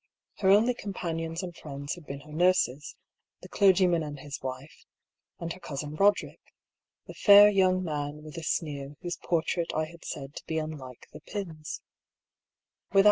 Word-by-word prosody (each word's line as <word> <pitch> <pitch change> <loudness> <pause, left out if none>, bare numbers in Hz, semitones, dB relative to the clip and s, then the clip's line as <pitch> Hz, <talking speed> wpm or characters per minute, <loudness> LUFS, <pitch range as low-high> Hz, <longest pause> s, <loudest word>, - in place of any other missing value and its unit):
Her 190 - +3
only 215 +5 +5
com 205 -4 -6
panions 165 0 -3
and 175 -2 -6
friends 140 -2 -6
had 175 -4 -11
been 140 0 -6
her 150 +1 -14
nurses, 155 -5 +2 0.5
the - - -8
clergyman 185 -4 +4
and 145 -2 -6
his 140 0 -7
wife, 130 +3 -7 0.6
and 170 0 -4
her 185 - -13
cousin 150 -3 -5
Roderick, 200 +6 +2 0.6
the - - -9
fair 205 0 +8
young 185 -2 +3
man 150 -2 -4
with 155 -1 -10
a 165 - -5
sneer 145 -4 -2
whose 175 -1 -3
portrait 170 0 -1
I 155 - +1
had 170 +1 -14
said 135 -1 -6
to - - -8
be 160 - -1
unlike 150 -6 -6
the 150 - -10
Pyms. 165 -4 -6
160 Hz, 165 wpm, -28 LUFS, 145-185 Hz, 0.6 s, fair